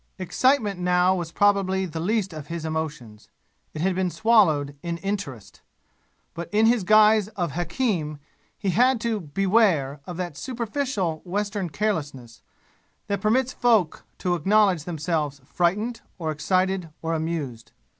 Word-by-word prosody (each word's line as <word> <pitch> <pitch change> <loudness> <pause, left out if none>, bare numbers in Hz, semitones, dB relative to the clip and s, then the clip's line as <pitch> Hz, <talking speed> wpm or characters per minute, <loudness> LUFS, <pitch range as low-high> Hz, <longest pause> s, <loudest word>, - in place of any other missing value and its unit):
Excitement 205 +1 +1
now 180 +1 +3
was 175 -3 -3
probably 195 -1 +2
the 165 -2 -6
least 195 +1 0
of 155 -2 -8
his 170 -1 -5
emotions. 150 -9 -5 0.5
It 155 - -4
had 190 +2 +1
been 185 0 0
swallowed 170 -10 +3
in 170 -1 -3
interest. 180 - -5 0.7
But 170 0 -6
in 215 +2 +3
his 230 -2 +3
guise 215 0 +5
of 175 -3 -1
hakim 170 - -1 0.4
he 195 -3 -1
had 250 +5 +3
to 230 -2 -1
beware 170 -5 +1
of 175 -2 -6
that 175 -5 -4
superficial 235 - -2
western 200 0 -2
carelessness, 145 - -3 0.6
that 200 -1 -2
permits 250 +5 +2
folk 220 -9 +2
to 180 - -1
acknowledge 190 -3 +3
themselves 155 -4 -2
frightened 210 - -1 0.2
or 160 -4 -2
excited 185 +3 0
or 165 0 -1
amused. 155 -8 -4
180 Hz, 135 wpm, -24 LUFS, 160-210 Hz, 0.7 s, guise